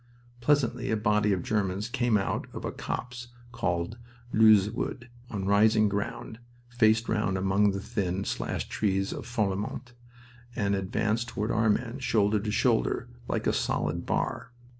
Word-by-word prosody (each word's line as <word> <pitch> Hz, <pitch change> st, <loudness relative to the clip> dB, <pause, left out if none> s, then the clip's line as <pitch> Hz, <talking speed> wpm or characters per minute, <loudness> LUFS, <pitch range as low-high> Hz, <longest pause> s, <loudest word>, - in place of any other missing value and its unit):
Presently 125 Hz, -2 st, +1 dB
a 110 Hz, -, +1 dB
body 105 Hz, 0 st, +2 dB
of 90 Hz, -3 st, 0 dB
Germans 100 Hz, -1 st, -1 dB
came 120 Hz, -2 st, +1 dB
out 95 Hz, -, -2 dB
of -, -, -6 dB
a -, -, -2 dB
copse 120 Hz, -1 st, -5 dB, 0.2 s
called 90 Hz, 0 st, -2 dB, 0.3 s
Leuze 105 Hz, -2 st, +6 dB
Wood, 120 Hz, +1 st, -4 dB, 0.2 s
on 100 Hz, -3 st, -4 dB
rising 105 Hz, +2 st, +4 dB
ground, 100 Hz, +2 st, -4 dB, 0.3 s
faced 115 Hz, -1 st, +3 dB
round 105 Hz, -3 st, 0 dB
among 95 Hz, +2 st, +3 dB
the 100 Hz, 0 st, -2 dB
thin, 100 Hz, -3 st, -2 dB
slashed -, -, -3 dB
trees 95 Hz, -2 st, 0 dB
of -, -, -7 dB
Falfemont, 110 Hz, +2 st, -2 dB, 0.6 s
and 100 Hz, -4 st, 0 dB
advanced 105 Hz, +4 st, 0 dB
toward 110 Hz, -1 st, -2 dB
our 110 Hz, 0 st, +2 dB
men, 120 Hz, +4 st, 0 dB
shoulder 105 Hz, -4 st, +2 dB
to 105 Hz, +1 st, -4 dB
shoulder, -, -, +1 dB, 0.2 s
like -, -, -2 dB
a -, -, +2 dB
solid 80 Hz, +4 st, -1 dB
bar. -, -, -2 dB
105 Hz, 150 wpm, -28 LUFS, 100-115 Hz, 0.6 s, Leuze